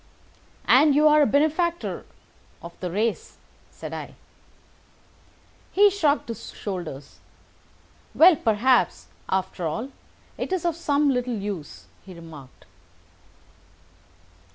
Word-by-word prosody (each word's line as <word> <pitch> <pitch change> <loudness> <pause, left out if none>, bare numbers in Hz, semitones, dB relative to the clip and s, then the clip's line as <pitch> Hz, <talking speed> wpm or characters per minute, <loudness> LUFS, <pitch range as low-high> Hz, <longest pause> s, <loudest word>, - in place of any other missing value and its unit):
"And 295 -2 +5
you 305 +1 +5
are 300 0 +5
a 290 - +4
benefactor 315 +4 0 0.6
of 170 0 -9
the 180 - -4
race," 215 +4 -2 0.3
said - - -9
I. - - -7 1.6
He 405 +1 +5
shrugged 310 -7 +1
his 230 - -7
shoulders. 175 -9 -7 1.0
"Well, 345 +1 +7
perhaps, 245 +1 +1 0.2
after 185 -2 -2
all, 225 - -4 0.5
it - - -4
is 370 -3 -1
of 340 -2 0
some 290 -3 +1
little 250 -1 -1
use," 200 -7 -6 0.2
he 185 -2 -12
remarked. 155 -6 -13
250 Hz, 105 wpm, -24 LUFS, 185-305 Hz, 1.6 s, Well